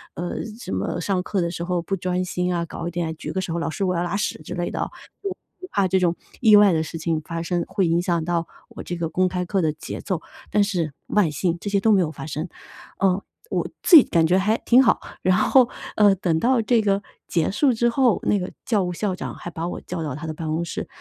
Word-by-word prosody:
呃， 175 0 -3 0.2
什 - - -7
么 95 - -2
上 185 0 0
课 195 -2 -1
的 170 0 -1
时 170 - -6
候 180 -1 0
不 195 +3 -2
专 180 +1 -1
心 180 0 -1
啊， 170 - 0
搞 170 +1 -6
一 - - -3
点 165 -2 -2
举 - - -5
个 190 - -1
手， 170 -2 -3
老 165 - -2
师 155 +6 -3
我 180 -1 +1
要 170 - 0
拉 175 - -2
屎 205 - -2
之 - - -7
类 175 0 -2
的 - - -4
哦， - - -1 0.3
我 395 - -1 0.3
我 370 - -8
怕 200 -2 +2
这 190 +1 +3
种 175 -1 +2 0.2
意 220 -3 +7
外 205 -2 +7
的 160 - +2
事 165 +1 -6
情 160 -1 -1
发 165 +1 -5
生， 175 0 -1
会 195 -4 0
影 170 +1 +2
响 170 -3 0
到 170 -1 -1 0.2
我 - - -9
这 175 - -4
个 165 -2 -2
公 185 +3 +2
开 180 0 -2
课 195 +1 0
的 155 -2 +2
节 - - -7
奏， 185 -5 -2 0.3
但 210 - +4
是 170 -8 -1
万 205 -6 +3
幸 170 +4 -1
这 205 - -4
些 200 -1 +2
都 220 - +4
没 200 - +5
有 155 - -1
发 155 - -8
生。 155 +4 -4 0.5
呃， 195 0 +2 0.3
我 - - -1 0.2
自 350 - +7
己 280 - +9
感 165 -1 +2
觉 180 +2 +3
还 215 +4 +2
挺 250 +2 +5
好， 230 - +3 0.2
然 185 0 +3
后 250 +3 +5 0.3
呃 205 -2 +6
等 170 -3 0
到 245 +4 +3
这 225 0 +3
个 200 -1 +1 0.3
结 165 -3 +1
束 265 +6 +3
之 235 +1 +2
后， 245 -1 +3
那 205 - +2
个 180 - -4
教 215 -7 +2
务 180 - -2
校 190 0 -2
长 - - -5
还 175 - -7
把 165 +1 -4
我 - - -5
叫 175 -2 -5
到 145 -4 -3
他 160 +2 -6
的 155 - -3
办 160 0 -6
公 160 +2 0
室。 - - -5
180 Hz, 285 characters per minute, -23 LUFS, 170-200 Hz, 0.5 s, 己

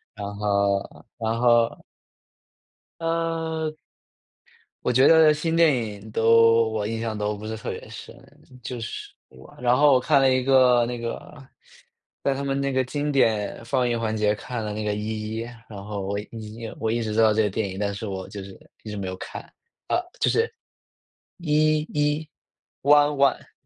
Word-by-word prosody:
然 100 0 -6
后 100 -1 0
然 115 0 -1
后 120 -1 +3 1.2
呃。 165 -1 -2 1.1
我 125 - +1
觉 130 +3 +5
得， 160 -1 +7
新 160 +2 -1
电 165 -3 +5
影 110 -3 -5
都 115 0 +5
我 110 -2 -2
印 115 0 -3
象 115 -2 -3
都 105 0 -1
不 105 +1 -8
是 110 +1 -4
特 110 - -6
别 - - -7
深。 - - -10 0.5
就 125 +2 -5
是 115 - -6 0.2
我 65 0 -16
然 120 0 +2
后 145 +1 +5
我 - - +5
看 140 +2 +3
了 135 -1 +4
一 130 -1 +1
个 125 -2 +5
那 120 0 -4
个 115 0 -4 1.0
在 140 - +1
他 140 - -4
们 135 0 -1
那 140 0 0
个 130 -1 +1
经 145 +3 -2
典 115 -6 +1
放 125 +1 +1
映 120 -1 0
环 110 -1 -1
节， 105 -1 +2
看 115 +2 -5
了 105 -1 -4
那 105 0 -4
个 105 - -1
《一 110 +1 -4
一》， 115 - -3 0.3
然 100 -2 -8
后 100 -1 -5
我 100 +1 -2
《一 110 -2 -8
一》 115 -1 -6
我 110 0 -1
一 120 - 0
直 110 -1 -3
知 115 - +3
道 110 -1 +5
这 110 +1 +2
个 105 - +1
电 105 +2 -2
影， 95 - -7
但 100 0 -1
是 105 +2 -6
我 95 -1 -5
就 100 -2 -8
是 95 -1 -12 0.2
一 110 - -8
直 105 - -5
没 95 - -4
有 95 - -4
看。 - - -8 0.4
啊， - - +1 0.2
就 - - +3
是， - - +2 1.0
《一 155 0 +3
一》， 150 0 +1 0.7
One 145 0 +5
One。 140 -1 +1
115 Hz, 215 characters per minute, -24 LUFS, 105-135 Hz, 1.2 s, 得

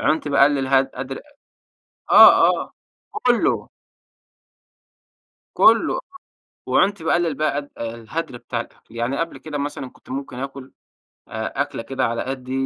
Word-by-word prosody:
عُنت 155 0 0
باقلّل 140 -1 +3
هد 135 0 +3
هدر 135 +1 -6 0.9
آه، - - +8
آه. - - -9 0.4
وكُلّه. 245 - +1 1.9
كله. - - +4 0.7
وعُنْت 200 -3 +1
باقلّل 165 0 +1
بقي 155 +1 0
قد 145 0 -4
الهدر 115 +4 -5
بتاع - - -5
الأكل. - - -17
يعني 120 +4 -2
قبل 165 0 -3
كده 155 -2 -6
مثلًا، 140 -2 -4
كنت - - -23
ممكن 130 -1 -6
آكُل 135 0 -7 0.6
أ 110 +5 -2
أكلة 145 -4 -6
كده 135 +2 -2
على 115 0 -2
قدّي 130 -1 -6
135 Hz, 130 wpm, -21 LUFS, 130-155 Hz, 1.9 s, آه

